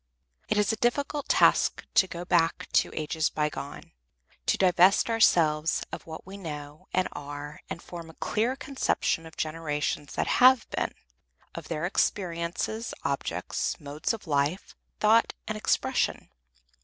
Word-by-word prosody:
It - - +1
is 210 +1 +3
a - - -3
difficult 280 +4 -1
task - - +4
to 205 -4 +5
go 175 0 -6
back 170 -2 +2
to - - +4
ages 155 0 -1
by 150 -1 0
gone, 140 -1 -8 0.6
to - - +3
divest 185 +4 +4
ourselves 165 -8 +3
of - - -7
what 160 0 -8
we 195 +1 -9
know 150 -4 -8
and 185 0 +1
are 145 +1 -7
and 170 - -6
form 170 -2 -8
a 160 - -14
clear 235 +5 0
conception 265 - -1
of 160 - -15
generations 150 -2 -2
that - - 0 0.2
have 255 -1 +7
been, - - -2 0.6
of - - -8
their 160 0 -2
experiences, 180 +4 -1
objects, - - -2
modes 145 0 -2
of 225 -3 -6
life, 145 +3 -1 0.2
thought 220 +2 +4
and 215 - -2
expression. 215 - 0
170 Hz, 145 wpm, -28 LUFS, 155-210 Hz, 0.6 s, have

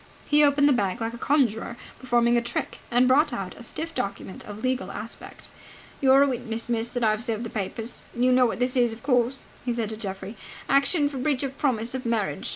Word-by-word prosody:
He 295 0 +4
opened 285 0 +5
the 285 - +5
bag 200 -6 0
like 225 0 -2
a - - -6
conjurer 235 -5 +1 0.2
performing 240 -2 +2
a 240 - +3
trick, 235 - -4
and 245 +1 +4
brought 290 +4 +4
out 195 -6 -4
a - - -12
stiff 320 +7 -5
document 200 -5 -4
of 210 +2 -8
legal 255 -7 -1
aspect. 215 +3 -9 0.5
"You're 270 0 +6
a - - +3
witness, 235 -3 -3
miss, 230 0 0
that 245 -1 -3
I've 215 0 +2
served 230 -2 -2
the 230 - -6
papers. 220 +3 -5
You 250 +1 +3
know 250 0 +5
what - - -3
this 250 +2 0
is, 240 -3 +3
of 225 - -7
course?" 250 -1 +1 0.2
he 245 - -1
said 230 -2 -2
to 220 - -5
Geoffrey. 195 0 -6 0.3
"Action 285 +2 +3
for 280 -2 -5
breach 275 0 0
of 270 -1 -3
promise 235 -4 0
of 260 -1 -4
marriage. 210 -11 -1
240 Hz, 220 wpm, -26 LUFS, 225-265 Hz, 0.5 s, You're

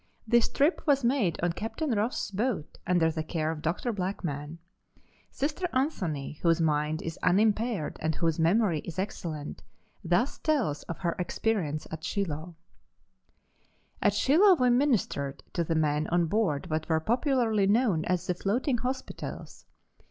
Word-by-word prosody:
This 235 +1 +3
trip 295 +6 +2
was 275 -2 +4
made 235 - +1
on 175 -1 +2
Captain 225 - -3
Ross' 215 0 -1
boat, 205 - -2
under 170 -3 +3
the 160 0 -3
care 155 0 -2
of 155 -2 -6
Dr. 175 +10 -1
Blackman. 170 -6 -4 0.7
Sister 305 +6 -2
Anthony, 180 - -2
whose 165 -1 +3
mind 155 0 0
is 165 0 -5
unimpaired 210 -1 +1
and 160 0 0
whose 165 -1 0
memory 175 0 +3
is 175 +3 -8
excellent, 165 -6 -4 0.4
thus 180 +10 +1
tells 255 - 0
of 170 - -3
her 170 -2 -1
experience 180 -5 -1
at 160 0 -6
Shiloh: 175 -3 -3 1.5
"At 205 -1 +3
Shiloh 355 - +5
we 250 -5 +3
ministered 230 - +1
to 170 - 0
the 165 0 -1
men 150 -1 +1
on 175 0 +2
board 175 -4 0
what 155 +1 -2
were 160 -1 +3
popularly 230 - +1
known 205 -6 +2
as 180 -2 0
the 180 - 0
floating 235 - 0
hospitals. 260 +2 -5
180 Hz, 145 wpm, -28 LUFS, 160-235 Hz, 1.5 s, Shiloh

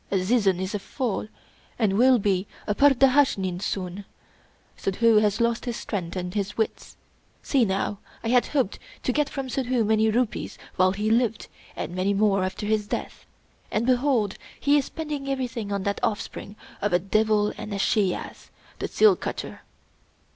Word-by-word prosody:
Azizun 195 -1 +2
is 190 +2 -3
a 205 - -1
fool, 225 0 -3 0.5
and 215 -5 +2
will 255 +3 +6
be 195 -2 0 0.2
a 210 - 0
pur 285 +7 +6
dahnashin 255 -9 +3
soon. 195 -1 -3 0.7
Suddhoo 220 +3 +2
has 210 +1 +1
lost 235 +1 +1
his 240 -2 -3
strength 180 -5 -4
and 180 -1 -4
his 200 -2 -3
wits. 220 - -3 0.5
See 265 -5 +3
now! 195 +1 -1 0.2
I 225 - -1
had 245 0 +4
hoped 265 -9 -1 0.2
to 250 - 0
get 295 0 +1
from 270 -2 -4
Suddhoo 255 -2 0
many 220 +1 +3
rupees 240 +1 -1 0.2
while 185 0 +3
he 210 +2 -1
lived, 230 -1 +1 0.3
and - - -5
many 190 +2 0
more 195 -2 +3
after 185 +2 -3
his 210 -1 0
death; - - -5 0.4
and 215 +2 0
behold, 250 -5 +1 0.2
he 285 +1 +3
is 285 -3 +3
spending 295 -4 -5
everything 245 -6 -3
on 200 -1 -1
that 200 +1 -1
offspring 205 -1 -3 0.3
of 205 -2 0
a - - +6
devil 210 +2 +2
and 210 - -7
a 200 - -2
she 195 -1 +2
ass, - - -9 0.3
the - - -2
seal 425 -3 +5
cutter!" - - -6
215 Hz, 170 wpm, -25 LUFS, 195-250 Hz, 0.7 s, will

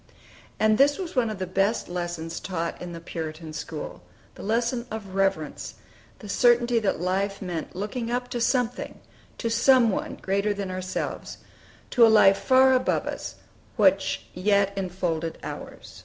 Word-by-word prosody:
And 215 0 +3
this 285 +1 +5
was 360 -5 -6
one 240 -3 +2
of 215 - -4
the 185 - -3
best 195 +5 0
lessons 175 -2 -4
taught 170 -3 -4
in 180 - -6
the 170 - -7
Puritan 160 -1 -6
school, - - -6 0.3
the - - -12
lesson 235 +3 0
of 210 -3 -7
reverence, 195 -5 -1 0.4
the 210 - -11
certainty 240 +2 +3
that 205 -7 0
life 195 +3 -1
meant 175 -3 -5
looking 215 +5 -3
up 245 +1 -1
to 240 -1 -3
something, 250 0 0 0.4
to 230 - -2
Some 235 0 +5
One - - -3
greater 200 +2 -1
than 200 -2 -4
ourselves, 185 0 -4 0.5
to 245 - +5
a 225 - +8
Life 195 -3 +6
far 260 0 +5
above 255 - +1
us, - - -5 0.4
which - - +3
yet 200 +1 +2
enfolded 175 -4 -2
ours. - - -8
200 Hz, 155 wpm, -26 LUFS, 180-235 Hz, 0.5 s, a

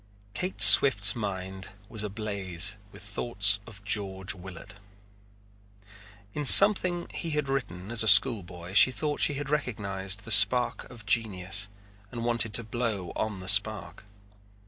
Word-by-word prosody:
Kate 185 +1 -7
Swift's 105 -7 +6
mind 95 -3 -8 0.2
was 110 0 -9
ablaze 100 -3 -3 0.2
with - - -14
thoughts 105 -1 -2
of 100 -3 -16
George 95 -1 -5
Willard. 95 -1 -14 1.6
In 150 - -6
something 180 +1 +7
he 170 - -8
had 150 -2 -4
written 110 -8 -7
as 120 - -1
a 110 - -3
school 105 +2 +5
boy 90 0 -13
she 100 - +5
thought 150 +2 -6
she 145 - 0
had 145 0 -8
recognized 100 -8 -5
the 115 - -7
spark 115 +4 +2
of 120 -4 -16
genius 100 -2 -2 0.4
and 115 -1 -8
wanted 120 -2 -2
to 115 - +2
blow 110 -5 -6
on 105 -4 -6
the 95 - -12
spark. 100 +2 -1
105 Hz, 145 wpm, -25 LUFS, 95-120 Hz, 1.6 s, something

